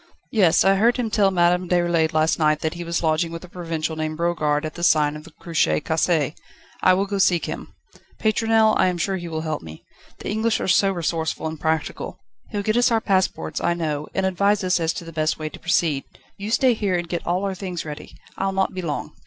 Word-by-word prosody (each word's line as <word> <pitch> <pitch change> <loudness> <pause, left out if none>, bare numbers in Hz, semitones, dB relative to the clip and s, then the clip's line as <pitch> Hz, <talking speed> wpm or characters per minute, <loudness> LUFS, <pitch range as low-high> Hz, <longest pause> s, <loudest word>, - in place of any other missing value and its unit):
"Yes; 190 -8 +4
I 195 0 +4
heard 235 +5 +3
him 235 -3 -2
tell 205 -2 +4
Madame 180 -1 +2
Déroulède 175 -2 +2
last 155 +1 +2
night 155 -1 +2
that 160 - -1
he 175 0 -6
was 170 0 -2
lodging 160 +1 +1
with 165 +1 -7
a - - -10
provincial 165 -3 -4
named 155 0 -3
Brogard 155 -3 0
at 155 - -5
the 170 - -8
Sign 150 -3 +3
of 150 +1 -9
the 165 - -13
Cruche 155 - +1
Cassée. 160 -2 +1 0.5
I'll 185 +2 +4
go 200 0 -3
seek 175 -3 +3
him, - - -7 0.4
Pétronelle; 220 0 +3
I - - +5
am 180 -1 -1
sure 190 +3 -1
he 175 -1 -6
will 160 -1 -3
help 155 -1 -3
me. 80 -1 -11 0.3
The - - -8
English 220 +1 +1
are - - -2
so 195 +1 +4
resourceful 165 -3 -2
and 160 -1 -4
practical. 160 -1 -2 0.3
He'll 205 -2 -3
get 215 +3 +1
us 245 - +4
our 230 -1 +3
passports, 190 -6 0
I 170 - +1
know, 155 -3 -2
and 190 - +1
advise 200 +2 +2
us 180 -1 +2
as 165 -1 +1
to 170 - -7
the 165 - -9
best 155 0 0
way 155 -1 -4
to - - -12
proceed. 160 -5 +1
Do - - -22 0.2
you 205 +2 -4
stay 250 +2 +4
here 205 -4 -1
and 175 0 -4
get 170 0 -4
all 180 +3 0
our 195 - -1
things 185 -3 -5
ready. 150 -1 -8 0.2
I'll 195 0 0
not 190 0 0
be 185 - -4
long." 155 -4 -4
175 Hz, 235 wpm, -23 LUFS, 160-195 Hz, 0.5 s, I